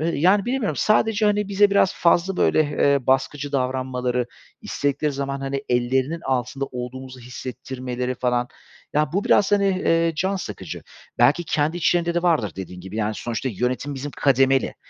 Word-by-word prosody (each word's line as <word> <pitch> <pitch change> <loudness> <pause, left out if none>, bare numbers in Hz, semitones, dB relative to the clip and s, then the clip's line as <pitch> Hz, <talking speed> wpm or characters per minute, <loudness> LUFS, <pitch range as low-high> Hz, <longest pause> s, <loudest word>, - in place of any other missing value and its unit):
eee, 160 - 0
yani 190 +7 +3
bilemiyorum 245 -3 -1
sadece, 215 0 +2
hani, 210 -1 +1
bize 200 0 +4
biraz 200 -2 +3
fazla 175 +2 +2
böyle, - - +3
eee, 140 -2 +1
baskıcı 140 +2 0
davranmaları, 125 -2 -1 0.3
istedikleri 145 +1 -1
zaman, 140 0 -3
hani, 135 0 -3
ellerinin 130 +6 0
altında 130 0 -2
olduğumuzu 130 0 -7
hissettirmeleri 125 +1 -5
falan, 125 0 0 0.4
ya, 150 0 +1
bu 200 +2 0
biraz, 205 - +3
hani, 200 -1 +4
eee, 165 -3 +2
can 190 +4 0
sıkıcı. 100 - -7 0.4
Belki, 170 +5 +4
kendi 155 +2 0
içlerinde 170 0 +1
de 175 - 0
vardır 155 - +1
dediğin 90 -1 -7
gibi, 95 +4 -8
yani, 110 0 -1
sonuçta 120 +3 -3
yönetim 125 +6 -2
bizim 140 +2 -5
kademeli. 135 -1 +3
140 Hz, 155 wpm, -23 LUFS, 125-170 Hz, 0.4 s, bize